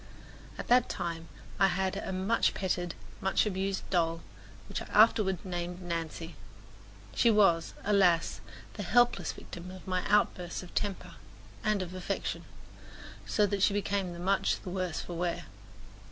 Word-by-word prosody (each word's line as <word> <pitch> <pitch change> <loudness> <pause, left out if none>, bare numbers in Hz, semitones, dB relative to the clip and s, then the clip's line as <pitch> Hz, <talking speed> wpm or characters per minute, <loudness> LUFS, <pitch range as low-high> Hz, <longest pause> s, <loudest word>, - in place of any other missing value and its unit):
At - - -6
that 245 0 +5
time 170 -3 -4 0.3
I 195 - +6
had 190 0 0
a - - -4
much 190 +5 +1
petted, 175 -2 -1 0.3
much 190 +3 +2
abused 195 -1 -2
doll, 165 -2 +1 0.4
which - - -4
I - - -6
afterward 210 -4 +4
named 175 -1 -4
Nancy. 165 -1 -4 0.8
She 235 - +4
was, 195 -7 +4
alas, 185 -5 +3 0.3
the 210 - -6
helpless 205 -3 +3
victim 175 +1 -9
of 185 0 -10
my 185 -1 -1
outbursts 185 -4 +1
of 180 - -12
temper 200 -3 -2 0.5
and 215 -3 +1
of 180 0 -8
affection, 185 +2 -3 0.8
so 210 - +3
that 200 -1 -1
she 200 - +4
became 195 -3 -1
much 195 +1 +2
the 180 - -6
worse 180 -3 -2
for 175 - -7
wear. 170 0 -2
185 Hz, 145 wpm, -30 LUFS, 175-200 Hz, 0.8 s, I